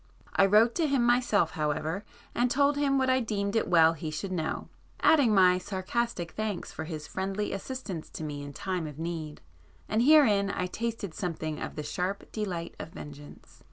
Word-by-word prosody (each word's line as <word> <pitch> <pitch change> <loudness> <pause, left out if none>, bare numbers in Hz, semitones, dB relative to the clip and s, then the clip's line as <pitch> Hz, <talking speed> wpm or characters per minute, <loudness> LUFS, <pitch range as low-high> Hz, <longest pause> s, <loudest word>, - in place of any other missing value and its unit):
I 195 - +5
wrote 220 +4 +5
to 330 -3 +2
him 275 -4 +2
myself 240 -8 +3
however 155 +5 -2 0.3
and 245 +1 +2
told 280 +3 +3
him 280 -1 +2
what 260 -1 +2
I 260 0 +3
deemed 205 -3 -2
it 225 - +2
well 165 -2 +6
he 160 0 -5
should 170 +5 -4
know, 160 -4 -2 0.3
adding 285 -8 +5
my 185 -3 +5
sarcastic 190 -1 -2
thanks 215 -4 -3
for 160 - -6
his 155 -2 -6
friendly 195 +2 -3
assistance 195 -5 -5
to - - -5
me 145 -2 -4
in 145 0 -7
time 180 +2 -3
of 150 -2 -9
need,—and 155 - -5
herein 240 -8 +5
I 180 - -1
tasted 220 -1 -4
something 160 -4 -4
of - - -5
the 150 - -4
sharp 185 +6 -3
delight 185 -6 -4
of - - -6
vengeance. 145 -2 -12
190 Hz, 180 wpm, -29 LUFS, 160-230 Hz, 0.3 s, well